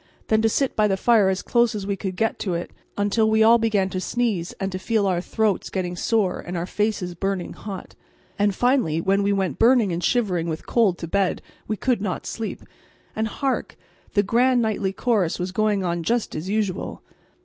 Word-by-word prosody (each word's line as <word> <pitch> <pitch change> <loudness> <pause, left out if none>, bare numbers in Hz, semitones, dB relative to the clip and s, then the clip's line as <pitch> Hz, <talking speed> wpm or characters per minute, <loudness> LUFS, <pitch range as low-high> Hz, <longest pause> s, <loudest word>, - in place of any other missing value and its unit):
Then 220 0 +3
to 225 - +3
sit 270 +4 0
by 215 -1 +3
the 195 -1 0
fire 215 -2 +4
as 190 0 -1
close 235 -2 +2
as 200 -2 -4
we 200 0 -1
could 190 -1 -4
get 225 +4 0
to 185 -4 -2
it, 170 - -4 0.3
until 205 +2 +2
we 220 0 +4
all 230 +2 +6
began 215 -4 +1
to 185 - -3
sneeze 215 -7 -1
and 195 0 -4
to 185 - -4
feel 220 +1 +1
our 180 -3 +1
throats 215 0 0
getting 180 -2 -3
sore 200 0 0
and 175 0 -5
our 170 - -2
faces 205 -2 -1
burning 195 +1 -3
hot. 195 -3 -8 0.5
And, 205 -1 +2
finally, 245 - +2
when 195 +3 +2
we 200 0 +1
went 195 -2 -1
burning 230 -4 +4
and 170 +1 -3
shivering 185 -9 +1
with 160 0 -5
cold 210 -7 +2
to 165 - -6
bed 195 +2 0 0.3
we 215 - -2
could 250 -3 0
not 195 -3 -3
sleep; 225 -1 -5 0.5
and 220 0 0
hark! 270 +4 -2 0.4
the 205 - +4
grand 245 +4 +3
nightly 215 -4 0
chorus 200 -4 0
was 180 +1 -3
going 205 -1 +1
on 170 -1 -1
just 230 +7 -1
as 160 +5 -5
usual. 205 -3 -2
200 Hz, 205 wpm, -23 LUFS, 185-225 Hz, 0.5 s, all